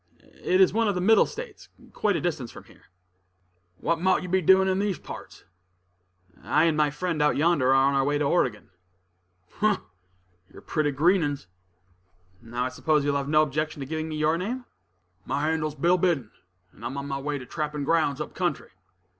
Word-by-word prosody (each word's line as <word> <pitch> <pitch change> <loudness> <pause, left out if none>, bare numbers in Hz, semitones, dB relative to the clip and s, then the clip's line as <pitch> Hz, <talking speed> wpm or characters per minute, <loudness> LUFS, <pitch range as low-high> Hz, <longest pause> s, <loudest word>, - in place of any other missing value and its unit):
"It 185 - +2
is 190 -1 +5
one 225 +1 +2
of 200 - 0
the - - -1
Middle 210 +4 +5
States, 470 -3 -9 0.2
quite 205 -3 +1
a - - -1
distance 145 -9 -2
from - - -12
here." - - -21 0.9
"What 170 - -1
mought 185 0 +2
you 180 - -6
be 190 +1 +2
doin' 190 +3 +5
in 190 0 +1
these 200 -2 -1
parts?" - - -10 1.0
"I - - +2
and 165 -2 +3
my 150 -1 +2
friend 155 +2 -2
out 150 - +2
yonder 150 -3 +2
are 135 - +5
on 135 +1 +4
our 135 -1 +2
way 145 +1 +1
to 150 - 0
Oregon." 130 - 0 0.9
"Umph! 210 -2 +3 0.7
you're - - -14
pretty 155 -2 0
green 170 +7 +3
'uns." 145 -8 -3 1.0
"Now 120 +1 -4
I - - -1
suppose 150 +3 0
you 145 - +2
will 140 - 0
have 140 0 -5
no 155 0 +5
objection 155 +1 -3
to - - -4
giving 155 +2 -4
me 155 - -4
your 155 +2 +1
name." 245 +7 -4 0.6
"My 145 - -2
handle's 155 -1 -1
Bill 175 +5 +2
Biddon, 160 - 0 0.4
and 110 - -17
I'm 125 +4 -4
on 140 0 -4
my 135 -1 -3
way 145 +1 -3
to 130 - -9
trappin' 150 -1 -4
grounds 150 -2 +1
up 150 - -5
country." 175 -6 -2
155 Hz, 200 wpm, -26 LUFS, 140-180 Hz, 1.0 s, is